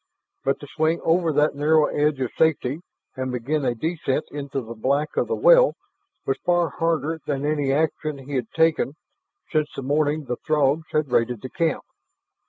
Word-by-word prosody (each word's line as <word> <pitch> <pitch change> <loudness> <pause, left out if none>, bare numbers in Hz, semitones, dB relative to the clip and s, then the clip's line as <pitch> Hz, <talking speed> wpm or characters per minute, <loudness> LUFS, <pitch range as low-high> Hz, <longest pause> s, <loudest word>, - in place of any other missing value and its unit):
But 135 - 0
to 145 - -9
swing 160 +3 0
over 165 0 +2
that 150 +1 +2
narrow 150 +2 +3
edge 150 -1 0
of 130 - -1
safety 155 -2 +1 0.3
and 130 -1 -3
begin 135 +5 -1
a 125 -2 0
descent 155 +1 -1
into 140 -1 -4
the 115 -1 -8
black 140 +6 -1
of - - +1
the - - -1
well - - +6 0.5
was 135 - 0
far 175 -2 +2
harder 160 0 -1
than 140 -1 -1
any 145 -2 0
action 155 0 0
he 135 +1 -9
had 125 -4 -2
taken 160 -3 +2 0.6
since 155 -2 +1
the 135 - -5
morning 150 +2 0
the 125 -1 -3
Throgs 155 +1 +1
had 155 -4 0
raided 120 -2 +1
the 130 - -6
camp. 165 -4 0
150 Hz, 180 wpm, -23 LUFS, 135-160 Hz, 0.6 s, well